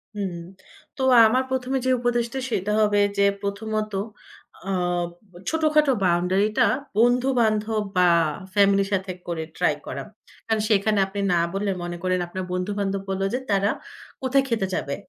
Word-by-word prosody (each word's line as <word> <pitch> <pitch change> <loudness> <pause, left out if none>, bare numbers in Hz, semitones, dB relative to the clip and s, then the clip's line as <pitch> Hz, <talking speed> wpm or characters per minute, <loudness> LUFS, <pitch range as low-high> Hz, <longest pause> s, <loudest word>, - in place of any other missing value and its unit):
হুম, 195 -4 -3 0.6
তো - - -4 0.3
আমার 255 +4 +2
প্রথমে 260 0 -1
যে - - +2
উপদেশটা 240 +1 -1
সেটা 205 -1 -1
হবে, 205 -1 +3 0.2
যে 200 - +4 0.2
প্রথমত 215 +1 -3 0.8
আ - - 0 0.8
ছোটখাটো 305 -3 +3
বাউন্ডারি 180 +3 +2
টা 250 - +5 0.3
বন্ধু-বান্ধব 225 -3 +2
বা 180 -1 +5 0.4
ফ্যামিলির 200 -1 +3
সাথে 190 -1 -1 0.2
করে 165 -2 -3
ট্রাই - - +2
করা। - - -5 0.4
কারণ 220 -1 +1
সেখানে 210 0 +2
আপনি 200 +1 -6
না 170 - +3
বললে, 200 +1 -1
মনে 175 0 -5
করেন, 185 0 +1
আপনার 185 +2 -5
বন্ধু-বান্ধব 195 +1 -2
বলল 190 0 -2
যে, 250 - 0
তারা 200 +1 +2 0.5
কোথায় 265 +1 +2
খেতে 220 -5 0
যাবে? 140 0 -2
205 Hz, 145 wpm, -24 LUFS, 195-240 Hz, 0.8 s, টা